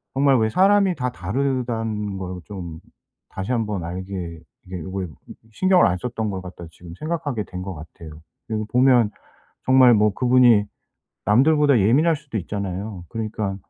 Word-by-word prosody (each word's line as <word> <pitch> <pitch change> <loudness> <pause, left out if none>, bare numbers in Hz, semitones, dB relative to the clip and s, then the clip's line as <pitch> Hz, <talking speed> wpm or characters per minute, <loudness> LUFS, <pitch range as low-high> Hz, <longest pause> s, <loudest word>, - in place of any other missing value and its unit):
'정말 135 -1 +4
왜 110 - +2
사람이 195 - +3
다 125 -1 -2
다르다는 115 -3 -2
걸 90 -1 -6
좀 85 -6 -8 0.5
다시 95 +5 -5
1 115 -3 0
번 100 -5 -4
알게 90 -2 -6 0.3
이게 90 0 -6
요거에 95 +2 -5 0.5
신경을 185 - +4
안 90 - 0
썼던 110 +1 -3
걸 95 -2 -4
갖다.' 90 -2 -10
지금 85 0 -12
생각하게 155 -8 -3
된 90 0 -7
것 95 -1 -6
같아요. 80 0 -12 0.3
그리고 110 -1 -2
보면 125 -4 +4 0.6
정말 130 -2 +6
뭐 105 -1 +3
그분이 125 -4 +4 0.6
남들보다 140 +4 +4
예민할 140 - +3
수도 140 -7 -6
있잖아요. 100 0 -5
그러니까 110 -3 -3
110 Hz, 310 characters per minute, -22 LUFS, 95-130 Hz, 0.6 s, 정말